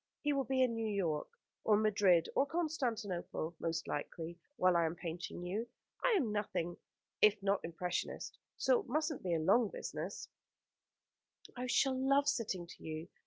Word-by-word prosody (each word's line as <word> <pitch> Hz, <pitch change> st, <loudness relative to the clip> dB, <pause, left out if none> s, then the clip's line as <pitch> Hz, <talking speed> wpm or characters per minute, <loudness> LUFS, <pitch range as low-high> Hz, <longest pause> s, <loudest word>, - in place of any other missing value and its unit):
He 295 Hz, -1 st, +2 dB
will 275 Hz, -1 st, +1 dB
be 260 Hz, -1 st, +3 dB
in 250 Hz, -2 st, +2 dB
New 225 Hz, -1 st, -1 dB
York, 175 Hz, -7 st, 0 dB, 0.4 s
or 210 Hz, -2 st, +5 dB
Madrid, 200 Hz, -5 st, +4 dB
or 275 Hz, -, +3 dB
Constantinople, 235 Hz, -, -2 dB
most 165 Hz, -1 st, -2 dB
likely, 165 Hz, +3 st, -4 dB, 0.2 s
while 185 Hz, -6 st, +4 dB
I 170 Hz, -, +4 dB
am 160 Hz, -, -3 dB
painting 170 Hz, +1 st, -5 dB
you. 210 Hz, +6 st, -2 dB, 0.4 s
I -, -, +4 dB
am 275 Hz, -, +2 dB
nothing 185 Hz, -5 st, -1 dB, 0.5 s
if 210 Hz, 0 st, +7 dB
not 200 Hz, 0 st, +2 dB
an -, -, -3 dB
impressionist, 175 Hz, +1 st, -3 dB, 0.2 s
so 260 Hz, -2 st, +4 dB
it -, -, -8 dB
mustn't 305 Hz, +3 st, 0 dB
be 175 Hz, -2 st, 0 dB
a -, -, +1 dB
long 200 Hz, +8 st, +4 dB
business." -, -, -5 dB, 1.3 s
"I 250 Hz, 0 st, -3 dB
shall 265 Hz, +2 st, +3 dB
love 275 Hz, +2 st, +3 dB
sitting 220 Hz, -11 st, 0 dB
to 170 Hz, -, -13 dB
you. 160 Hz, +2 st, -5 dB
210 Hz, 165 wpm, -35 LUFS, 175-260 Hz, 1.3 s, if